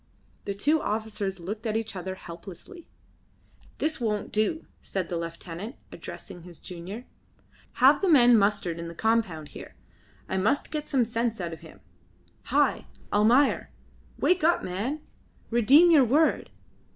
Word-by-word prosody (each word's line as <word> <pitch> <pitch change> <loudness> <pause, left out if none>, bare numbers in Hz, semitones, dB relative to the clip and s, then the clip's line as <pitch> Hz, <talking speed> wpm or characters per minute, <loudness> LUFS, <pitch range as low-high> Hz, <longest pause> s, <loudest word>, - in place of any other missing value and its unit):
The 200 - -3
two 300 +10 +2
officers 210 -3 -3
looked 210 +6 -5
at 220 0 0
each 220 -2 -4
other 185 +1 -5
helplessly. 190 - -11 0.9
"This 310 -4 -1
won't 210 -3 -1
do," 215 +10 0 0.2
said 190 -3 -4
the 175 - -2
lieutenant, 170 - -6 0.2
addressing 175 - -9
his 175 -1 -12
junior. 185 +7 -8 0.7
"Have - - +5
the 390 - +2
men 245 -6 +7
mustered 200 -5 +1
in 170 - -5
the 170 - -8
compound 195 -8 0
here. - - -11 0.5
I 190 - -2
must 220 +9 +1
get 300 -1 -4
some 260 -4 +2
sense 230 0 -1
out 170 -2 -4
of 165 - -9
him. - - -15 0.6
Hi! - - +1 0.3
Almayer! 235 +7 +3 0.5
Wake 360 -2 +2
up, 340 +2 +3
man. 225 +12 -3 0.5
Redeem 275 +10 +6
your 300 -5 +7
word. 300 +7 +2
215 Hz, 145 wpm, -27 LUFS, 185-260 Hz, 0.9 s, men